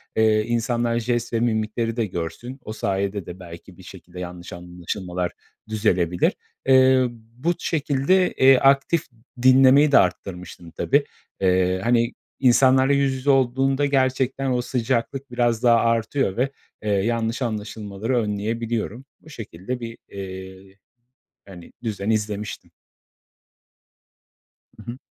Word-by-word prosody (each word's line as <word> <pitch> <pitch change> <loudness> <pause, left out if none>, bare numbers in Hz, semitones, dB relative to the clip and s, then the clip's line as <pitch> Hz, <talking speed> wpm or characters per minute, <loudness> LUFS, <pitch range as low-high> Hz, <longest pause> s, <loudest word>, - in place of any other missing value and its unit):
eee, 110 -1 +3
insanlar 120 0 0
jest 120 0 -2
ve 115 - +1
mimikleri 115 0 -1
de 115 - +1
görsün. 100 - -6
O 110 - -6
sayede 100 -2 -2
de 90 +1 -9
belki 85 -2 -12
bir - - -14
şekilde 90 +1 -12
yanlış 90 -1 -8
anlaşılmalar 90 +1 -5 0.4
düzelebilir. 90 -5 +1 0.3
Eee, 130 -1 +5 0.3
bu 170 +7 0
şekilde, 155 +4 +1
eee, 135 0 +6
aktif 140 +5 +3 0.4
dinlemeyi 135 +3 +6
de - - +7
arttırmıştım 90 -1 -2
tabii. 140 - +1 0.4
Eee, 95 0 +2
hani, 120 0 +2 0.3
insanlarla 130 +1 +4
yüz 140 -1 +2
yüze 130 +2 -3
olduğunda 135 +1 +2
gerçekten 130 -1 0
o 125 -1 +1
sıcaklık 125 +2 -2
biraz 120 -2 0
daha 120 -1 +6
artıyor 115 -1 0
ve, 130 +2 +1 0.3
eee, 105 - -2
yanlış 115 +4 0
anlaşılmaları 110 +1 -3
önleyebiliyorum. 115 +3 -2 0.2
Bu 155 - -16
şekilde 115 - -6
bir, 115 0 -7
eee, 95 0 -9 0.7
hani, 90 -3 -12
düzen 105 -3 -3
izlemiştim. 105 -1 -3 2.1
Hı 115 +2 -7
hı. 125 - -9
115 Hz, 120 wpm, -23 LUFS, 100-130 Hz, 2.1 s, de